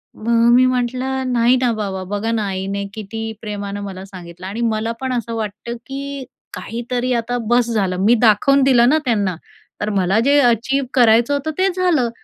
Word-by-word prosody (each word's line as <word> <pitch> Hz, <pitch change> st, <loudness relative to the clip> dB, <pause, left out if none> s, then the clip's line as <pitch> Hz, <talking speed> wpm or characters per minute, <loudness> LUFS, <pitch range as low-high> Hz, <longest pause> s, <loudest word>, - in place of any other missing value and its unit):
मग 230 Hz, +1 st, +2 dB
मी 255 Hz, +1 st, +6 dB
म्हटलं, 255 Hz, +1 st, -1 dB
"नाही 240 Hz, +1 st, +4 dB
ना 245 Hz, -2 st, +2 dB
बाबा, 195 Hz, -3 st, -4 dB
बघा 220 Hz, +3 st, -2 dB
ना 225 Hz, -2 st, 0 dB
आईने 195 Hz, +1 st, -3 dB
किती 225 Hz, +1 st, -6 dB
प्रेमानं 205 Hz, -2 st, -5 dB
मला 190 Hz, -2 st, -7 dB
सांगितलं 180 Hz, -2 st, -11 dB
आणि 210 Hz, +5 st, -5 dB
मला 225 Hz, -1 st, 0 dB
पण 260 Hz, -1 st, -2 dB
असं 230 Hz, -1 st, -3 dB
वाटतं, 220 Hz, +2 st, -5 dB
की 275 Hz, 0 st, -6 dB, 0.3 s
काहीतरी 245 Hz, +2 st, -3 dB
आता 240 Hz, +1 st, -1 dB
बस 240 Hz, +1 st, +2 dB
झालं. 195 Hz, -5 st, 0 dB
मी 235 Hz, +3 st, +5 dB
दाखवून 245 Hz, +5 st, +4 dB
दिलं 245 Hz, -2 st, +5 dB
ना 310 Hz, -, +4 dB
त्यांना, 205 Hz, -7 st, 0 dB, 0.5 s
तर 210 Hz, -, -1 dB
मला 195 Hz, +2 st, +2 dB
जे 285 Hz, +1 st, +5 dB
अचीव्ह 255 Hz, +2 st, +1 dB
करायचं 235 Hz, +1 st, +4 dB
होतं, 285 Hz, +2 st, -2 dB
ते 380 Hz, +1 st, +2 dB
झालं." 345 Hz, -10 st, +1 dB
230 Hz, 175 wpm, -19 LUFS, 205-255 Hz, 0.5 s, मी